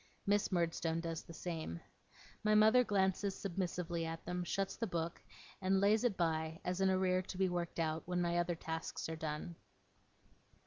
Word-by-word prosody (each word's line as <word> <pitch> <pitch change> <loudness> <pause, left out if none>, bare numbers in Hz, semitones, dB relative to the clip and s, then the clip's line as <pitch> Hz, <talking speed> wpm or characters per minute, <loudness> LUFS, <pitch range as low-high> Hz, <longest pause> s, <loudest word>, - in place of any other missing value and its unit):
Miss 205 +1 +2
Murdstone 165 -2 +1
does 165 -1 -3
the 165 - -12
same. 160 - -4 0.6
My 215 0 +4
mother 220 +4 +7
glances 195 -2 +1
submissively 175 -3 -2
at 165 0 -5
them, 180 0 -2
shuts 195 +2 -1
the 230 - -2
book, 170 -2 -3 0.4
and 190 0 +3
lays 210 +3 +4
it 235 -6 +1
by 160 -1 0
as 180 +1 -1
an 190 - +4
arrear 185 -1 +3
to 185 0 -7
be 190 -1 +3
worked 175 -1 -2
out 160 0 0
when 180 0 0
my 175 0 +1
other 175 0 0
tasks 160 0 -4
are 160 - -3
done. 160 +2 -4
175 Hz, 175 wpm, -36 LUFS, 165-190 Hz, 0.6 s, mother